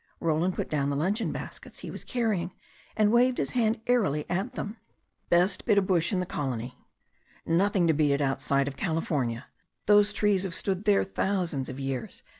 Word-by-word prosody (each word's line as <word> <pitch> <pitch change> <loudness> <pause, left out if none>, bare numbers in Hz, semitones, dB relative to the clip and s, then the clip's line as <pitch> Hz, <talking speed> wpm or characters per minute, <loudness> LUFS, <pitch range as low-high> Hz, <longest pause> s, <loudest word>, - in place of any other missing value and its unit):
Roland 165 +2 +1
put - - -2
down 140 -2 0
the 140 - -1
luncheon 195 +10 0
baskets - - -8
he - - -6
was - - -8
carrying, 210 -8 -1 0.4
and 215 -1 +4
waved 245 +2 +4
his - - -1
hand 230 -2 +1
airily 195 - +1
at 195 +8 -1
them. 215 -2 -5 0.5
"Best 180 +3 +3
bit 210 -3 +3
of 200 - +4
bush 175 -1 +1
in 190 - +1
the 180 - -1
colony. 125 -6 -4 0.7
Nothing 185 +2 +2
to 165 - +4
beat 145 -1 +2
it 140 - 0
outside 140 0 +1
of 140 - -4
California. 145 -8 -1 0.4
Those 205 0 +5
trees 205 -2 +2
have 185 -2 -3
stood 195 +1 -2
there 205 -2 +4
thousands 180 -8 -1
of 130 +1 -7
years. 135 -3 -4
180 Hz, 185 wpm, -28 LUFS, 145-205 Hz, 0.7 s, Those